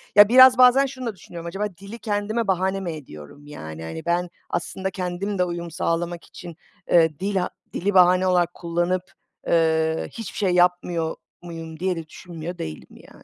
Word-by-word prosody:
Ya, 205 0 +9
biraz 255 +1 +8
bazen 255 +2 +6
şunu 260 -1 -7
da 225 -4 -3
düşünüyorum. 170 -2 -9
Acaba 195 +4 -2
dili 200 +4 -10
kendime 215 +1 -2
bahane 190 +1 0
mi 180 -3 -4
ediyorum? 145 - -11
Yani, 80 - -8
hani, 80 - -7
ben 175 +1 0 0.2
aslında 190 +2 -3
kendim 185 +2 -3
de 180 - +3
uyum 170 -1 -4
sağlamak 170 +1 -2
için, 175 -2 -11 0.4
eee, 160 -3 +4
dila 190 -1 -1 0.2
dili 200 +3 -1
bahane 185 0 +5
olarak 175 -1 +2
kullanıp, 175 +2 -1 0.5
eee, 160 -1 +2
hiçbir 225 -4 -8
şey 195 -3 +1
yapmıyor 175 -2 +1 0.3
muyum 165 -2 -8
diye 185 0 0
de 165 -2 -7
düşünmüyor 170 +1 -8
değilim 80 -1 -7
yani. - - -17
175 Hz, 170 wpm, -23 LUFS, 165-195 Hz, 0.5 s, Ya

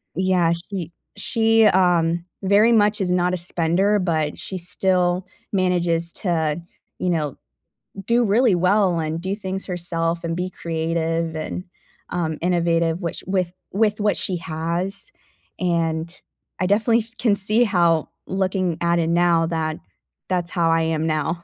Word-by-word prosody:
Yeah, 180 -2 +2 0.2
she 180 -5 -5 0.3
she, 225 -1 +3
um, 175 -3 +3 0.2
very 205 +4 +5
much 210 -2 +3
is 180 -2 0
not 180 0 +2
a - - 0
spender, 175 +4 +1
but 160 -4 -1
she 190 - -6
still 180 0 0 0.2
manages 175 -3 +1
to, 165 -4 -1 0.4
you 180 - 0
know, 150 -5 -1 0.7
do 235 +1 +3
really 220 -1 +3
well 185 -1 +2
and 160 +1 -2
do 190 +2 -2
things 195 -2 -5
herself 170 -2 -2
and 165 0 -2
be 180 +1 -2
creative 165 -1 -2
and, 155 +3 -4 0.5
um, 160 -3 -2
innovative, 170 -1 +1
which 170 -2 -4
with 185 -2 0 0.2
with 210 +1 +1
what 205 0 +1
she 185 -2 -1
has, 170 - -4 0.5
and 170 -1 -1 0.4
I 185 - +1
definitely 225 +3 +3
f 225 +1 -7
can 215 -4 +3
see 215 +4 +2
how 170 -7 +2 0.2
looking 185 -3 -1
at 170 0 +2
it 165 - +1
now 170 -1 +3
that 160 -2 -2 0.5
that's 175 -2 0
how 170 -3 +1
I 165 0 +3
am 160 -1 0
now, 160 +2 -1
175 Hz, 150 wpm, -22 LUFS, 165-190 Hz, 0.7 s, very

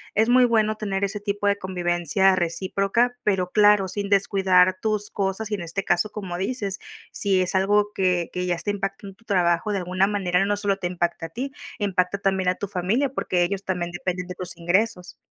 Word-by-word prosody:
es 220 +2 +3
muy 250 0 +6
bueno 215 -2 +2
tener 200 -2 -3
ese 200 +1 -2
tipo 205 0 -2
de 200 0 +2
convivencia 185 0 +1
recíproca, 195 +7 0
pero 185 -3 +1
claro, 205 -2 +5
sin 200 +1 -2
descuidar 190 -2 +3
tus 215 -1 -1
cosas 200 +2 -2
y, 210 - +1
en 190 - -6
este 170 +4 -3
caso, 190 +5 +1
como 185 -4 -5
dices, 200 -1 -3 0.3
si 195 -2 +1
es 185 +1 0
algo 205 +2 +2
que 180 -2 +1
que 180 0 -2
ya 180 - +1
está 170 +4 -4
impactando 195 0 -5
en - - -19
tu 225 - -27
trabajo 175 0 +1
de 200 - 0
alguna 185 +1 +1
manera, 195 -2 +1
no 205 +1 +1
solo 200 -1 0
te 190 - -6
impacta 175 -2 -2
a - - -21
ti, 260 - -5 0.3
impacta 195 -2 0
también 190 -2 +1
a 180 - +1
tu 205 - -5
familia, 205 +9 0
porque 180 -8 0
ellos 195 +2 -2
también 180 -2 -2
dependen 180 0 -3
de 180 - -7
tus 180 -1 -6
ingresos. 180 +2 0
195 Hz, 210 wpm, -24 LUFS, 180-205 Hz, 0.3 s, muy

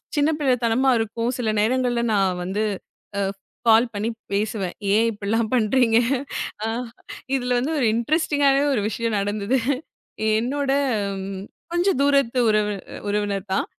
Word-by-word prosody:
சின்னப்பிள்ளத்தனமா 265 -4 +2
இருக்கும். 230 +1 -2
சில 235 -3 -1
நேரங்கள்ல 245 +1 +1
நா 205 - +3 0.3
வந்து 195 +4 -1 0.6
அ - - +1 0.5
கால் 225 +2 +6
பண்ணி 210 +2 -2 0.2
பேசுவேன். 200 -3 -1 0.2
ஏன் 220 +2 +4
இப்டில்லாம் 215 +2 -1
பண்றீங்க? 230 0 +3 0.7
அ - - 0 0.7
இதுல 250 -1 0
வந்து 275 +6 -1
ஒரு 250 - +2
இன்ட்ரெஸ்ட்டிங்காவே 285 +1 +2
ஒரு 215 - +1
விஷயம் 225 -1 -1
நடந்தது. 205 +5 0 0.8
என்னோட 275 +4 -2 1.0
கொஞ்சம் 345 -3 +1
தூரத்து 275 -3 +3
உறவு 210 -1 +2 0.4
உறவினர் 205 -1 -2
தான். 190 - +1
230 Hz, 115 wpm, -23 LUFS, 210-265 Hz, 1.0 s, கால்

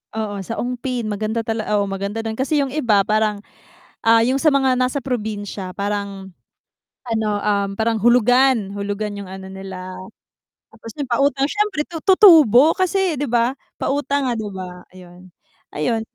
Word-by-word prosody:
Oo, 205 -3 -3
sa 225 +4 -6
Ongpin. 250 -1 -3
Maganda 215 +2 -2
tala 220 -1 -3
oo, 200 - +1
maganda 200 +3 -4
dun, 220 - -2
kasi 265 +6 -1
'yung 270 -1 -3
iba 220 -10 +2
parang, 215 0 +1 0.7
ah, 225 0 +6
'yung 260 +2 +1
sa 315 - +5
mga 270 -2 +3
nasa 255 +2 0
probinsya 205 -6 -4
parang 200 -2 -4 0.7
ano, 220 -2 -1
um, 200 -1 0
parang 225 0 +1
hulugan 245 -2 +3
hulugan 205 +1 -4
'yung 200 -2 -8
ano 190 0 -8
nila. 190 -1 -8 0.8
Tapos 230 - -11
'yung 280 -3 -4
pautang 275 +3 +1
siyempre 415 -7 -1
tu 325 -2 -6
tutubo 320 - +7
kasi 370 -4 +1
'di 290 - -1
ba 240 +1 +2 0.2
pautang 280 -1 -1
nga - - 0
'di 215 -2 -4
ba 180 -1 -8
ayun. 180 0 -15 0.5
Ayun, 225 +10 0
225 Hz, 155 wpm, -20 LUFS, 200-265 Hz, 0.8 s, tutubo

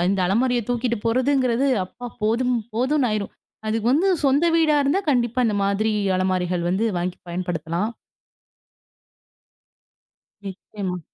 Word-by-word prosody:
இந்த 195 -1 0
அலமாரிய 240 +5 +1
தூக்கிட்டு 240 -1 0
போறதுங்கிறது 255 +1 +2 0.2
அப்பா 245 +6 -10 0.2
போதும் 245 +4 +1 0.2
போதுன்னு 260 +2 +1
ஆயிரும். 210 -2 -2 0.3
அதுக்கு 220 +1 -1
வந்து 355 +7 +3 0.2
சொந்த 280 +4 +3
வீடா 310 -2 +3
இருந்தா 285 +8 +1
கண்டிப்பா 240 -1 +1
இந்தமாதிரி 205 +1 +1 0.2
அலமாரிகள் 185 -1 0
வந்து 190 +5 +1
வாங்கி 180 +1 -3
பயன்படுத்தலாம். 175 +2 -2 2.6
நிச்சயமா. 190 -1 -5
225 Hz, 110 wpm, -23 LUFS, 190-255 Hz, 2.6 s, வந்து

